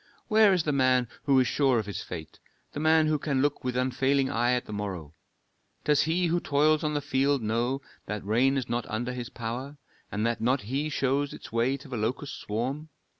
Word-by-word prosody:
"Where 215 -2 +6
is 180 -4 +2
the 150 - 0
man 130 -3 +3 0.2
who 135 -2 +5
is 130 - +4
sure 135 0 +2
of 110 - -1
his 100 - -5
fate, 80 -3 -8 0.3
the - - -5
man 160 0 +4
who 155 -1 +1
can 140 -2 -1
look 145 0 0
with 125 -1 -2
unfailing 130 +1 +1
eye 120 +2 +2
at 125 0 -1
the 105 - -8
morrow? 95 -7 -5 0.7
Does 150 -1 +3
he 170 +3 +1
who 170 +1 +1
toils 150 +1 +2
on 150 -1 -1
the 145 - 0
field 140 -1 +1
know 120 +5 0 0.3
that 105 -2 -4
rain 125 +6 +3
is 130 -3 -2
not 120 0 -2
under 120 +3 -2
his 125 -1 -5
power, 125 +6 -5 0.3
and 105 +2 -1
that 115 -1 -1
not 125 +3 +2
he 135 +8 -2
shows 140 0 0
its - - -11
way 120 +4 +1
to 140 - -13
the 125 -3 -4
locust 120 +6 -3
swarm? 130 +9 -3
130 Hz, 215 wpm, -28 LUFS, 115-145 Hz, 0.7 s, Where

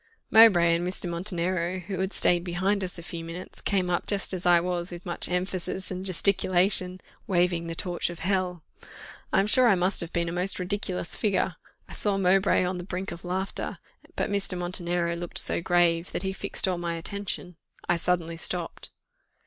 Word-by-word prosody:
Mowbray 195 -7 +7
and 175 +1 -2
Mr. 180 0 -3
Montenero, 175 0 -2
who 185 +1 -5
had 190 +1 -1
stayed 175 -3 +3
behind 190 +3 0
us 180 0 -4
a 170 - -8
few 165 0 -5
minutes, 165 +2 -8
came 190 -3 0
up 175 - -1
just 200 -1 0
as 180 -1 -2
I 175 -1 +6
was, 175 0 -2
with 175 0 -9
much 175 -2 +1
emphasis 185 +1 -2
and 185 0 -4
gesticulation, 185 0 +2 0.3
"Waving 175 -2 +1
the 165 - -4
torch 175 0 -2
of 175 - -7
Hell." 180 -1 -1 0.7
I - - +3
am 195 - +3
sure 250 +4 +4
I 210 - +5
must 185 +2 +1
have 170 0 -5
been 170 -1 -1
a - - -2
most 180 +3 +1
ridiculous 185 -1 -2
figure. 190 -4 0 0.3
I - - -11
saw 205 -2 0
Mowbray 195 0 +3
on 180 0 -2
the - - -5
brink 185 +1 -5
of 170 - -9
laughter; 185 +2 -3 0.4
but - - -1
Mr. 200 -2 0
Montenero 175 -1 -1
looked 175 0 -4
so - - +5
grave, 170 0 +2
that - - -2
he 190 0 -2
fixed 190 - 0
all 180 -2 -1
my 170 -1 -2
attention. 180 0 -5 0.3
I 175 - +2
suddenly 170 -1 -1
stopped. 175 0 -3
180 Hz, 190 wpm, -27 LUFS, 175-190 Hz, 0.7 s, Mowbray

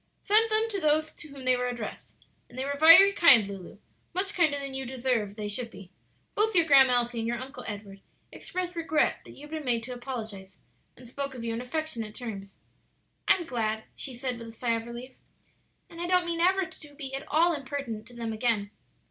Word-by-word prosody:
"Sent 435 +2 +4
them 435 +1 +3
to 400 - -2
those 310 -1 +1
to - - -11
whom 275 -3 -11
they 255 0 +4
were 250 0 -1
addressed. 240 -3 -7 0.3
And 245 - -14
they 260 - -2
were 285 - -2
very 330 +7 +9
kind, 265 - +7
Lulu; 195 -2 -9 0.4
much 390 +2 -1
kinder 310 -5 +2
than 275 -1 -4
you 265 0 -3
deserved 245 -5 -2
they 210 -1 -5
should 230 +3 -3
be; 195 -4 -13 0.4
both 435 0 +1
your 340 -2 +6
Grandma 270 -4 +7
Elsie 240 -1 0
and 225 - -2
your 240 +1 -1
Uncle 265 +3 -8
Edward 200 -2 -8 0.3
expressed 360 -1 -5
regret 320 -2 +1
that - - -12
you - - -14
had 295 +1 -12
been 315 -1 -4
made 235 -3 0
to 250 +2 -6
apologize, 225 -6 -7 0.4
and 250 - -13
spoke 275 +2 -5
of 240 - -7
you 230 -1 -2
in 230 - -4
affectionate 250 -5 -4
terms." 200 -5 -8 0.7
"I'm 350 - +3
glad,'" 220 -5 -2
she 265 -3 -4
said 250 -1 -3
with 230 - -9
a - - -9
sigh 235 +1 -2
of 230 0 -3
relief; 245 +2 -9 0.7
"and 335 - -10
I 345 - -2
don't 360 -1 +3
mean 340 -1 -2
ever 375 +2 +3
to 295 -3 -14
be 275 -2 -7
at 270 - -5
all 335 +3 +3
impertinent 275 -6 -5
to 245 - -15
them 230 -1 -4
again." 215 -3 0
255 Hz, 215 wpm, -28 LUFS, 230-315 Hz, 0.7 s, very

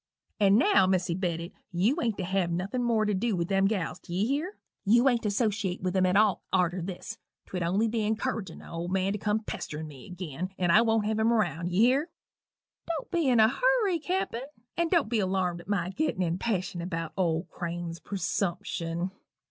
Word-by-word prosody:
And 200 0 +5
now, 285 - +5
Melissy 180 -2 +1
Bedott, 170 -1 -2 0.2
you 210 - +1
ain't 225 -7 0
to 190 - -2
have 185 -1 0
nothin' 190 +8 -2
more 230 -3 +2
to 210 - +1
dew 210 +2 0
with 170 -1 -2
them 195 0 +3
gals 185 -5 -2
d'ye 185 +4 -2
hear? 300 - -2 0.3
You 235 +6 +5
ain't 240 -3 +3
to 210 - 0
'sociate 200 -4 -1
with 185 0 -1
'em 185 -1 +4
at 180 - +1
all 215 +2 +4
arter 180 -1 +2
this 175 +1 -6 0.3
twould 180 - -4
only 190 +7 +2
be 225 +1 -1
incurridgin' 215 -3 -2
th' - - -13
old 170 +2 -4
man 190 +1 +1
to 210 - -3
come 210 +2 0
a - - -21
pesterin' 155 -6 -5
me 140 -4 -12
agin 180 -1 -5
and 175 -2 +2
I 215 - +7
won't 225 -2 +2
have 215 +1 0
him 225 +1 +3
round 175 -7 0
d'ye 180 +4 +2
hear? 270 +7 +3 0.8
Don't 325 -4 -4
be 335 -6 +2
in 245 -3 +4
a 220 - +7
hurry, 430 - +2
Cappen 315 -7 -2 0.3
and 340 -1 +1
don't 335 - +3
be 225 0 0
alarmed 185 -3 0
at 175 - -17
my 185 -3 0
gittin' 195 -6 0
in 165 -1 0
such 180 - -4
passion 185 -6 -2
about 165 -2 -4
old 170 -2 0
Crane's 170 -1 -5
presumption. 180 -3 -2
195 Hz, 210 wpm, -28 LUFS, 175-230 Hz, 0.8 s, I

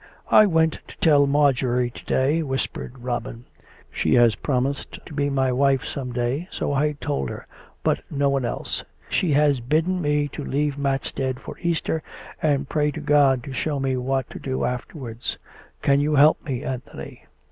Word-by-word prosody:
" - - -22
I 215 - +5
went 160 -3 +2
to - - -13
tell 145 -3 +5
Marjorie 130 -4 +2
to - - -12
day," 145 +5 +2
whispered 135 -2 -3
Robin. 120 -1 -4 0.2
" - - -24
She - - +1
has 120 -2 +6
promised 135 +2 -2
to 160 - -10
be 145 -1 0
my 135 -2 +1
wife 135 +1 +2
some 130 -3 -4
day; 125 +7 -1
so - - -2
I 150 +2 +1
told 70 - -3
her, - - -7 0.4
but - - +1
no 140 -1 +1
one 135 -1 +1
else. 120 - -3 0.3
She 170 -5 +1
has 145 -2 +3
bidden 160 +9 0
me 145 -1 +1
to 145 - -6
leave 145 +1 0
Matstead 135 -2 -2
for - - -8
Easter, 165 -2 -1 0.4
and 140 -3 +1
pray 150 0 +1
to 145 - -5
God 140 -4 +3
to 135 - -7
show 145 +1 -1
me 135 -1 0
what 130 0 -1
to - - -7
do 130 -1 -2
afterwards. 125 -1 -4 0.5
Can 140 0 +4
you 150 +1 +1
help 150 +3 +5
me, 130 -6 -3
Anthony 130 -1 -7
140 Hz, 180 wpm, -23 LUFS, 130-150 Hz, 0.5 s, has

